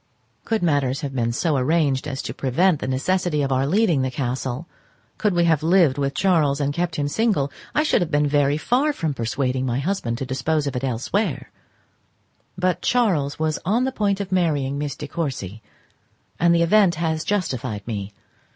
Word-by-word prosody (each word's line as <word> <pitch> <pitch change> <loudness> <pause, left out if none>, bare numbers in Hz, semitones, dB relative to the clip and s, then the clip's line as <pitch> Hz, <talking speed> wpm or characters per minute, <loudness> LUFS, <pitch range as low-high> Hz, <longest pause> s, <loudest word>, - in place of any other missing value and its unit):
Could 225 -4 0
matters 140 -4 +1
have 140 -3 -4
been 120 -3 0
so 150 +4 0
arranged 140 0 +1
as 135 -2 -4
to - - -5
prevent 155 +5 +1
the - - -4
necessity 150 +3 0
of 135 - -1
our 135 +1 +1
leaving 175 -4 +2
the 130 - 0
castle, 130 +3 -3 0.5
could 210 -4 +1
we 175 - +3
have 160 -3 +3
lived 165 -4 +3
with 140 0 -1
Charles 155 -7 +2
and 145 0 0
kept 170 0 -2
him 145 -2 -1
single, 160 -5 +1 0.2
I 300 - +3
should 310 - +2
have 175 - -1
been 150 -2 +2
very 145 0 +2
far 265 - +1
from 160 - -2
persuading 130 +1 -1
my 120 0 0
husband 140 -6 -2
to 135 - -4
dispose 140 +4 -1
of 140 - -3
it 125 - -3
elsewhere; 135 - -2 1.1
but 180 -1 0
Charles 180 - +1
was 155 -1 -1
on 220 +8 +1
the 265 - 0
point 205 -5 0
of 195 -2 -5
marrying 145 -7 0
Miss 145 -2 -3
De 150 - -7
Courcy, 130 - -4 0.8
and 170 +1 +4
the 170 - +3
event 190 0 +4
has 160 -1 -1
justified 130 - -2
me. 105 -3 -4
150 Hz, 190 wpm, -22 LUFS, 135-175 Hz, 1.1 s, and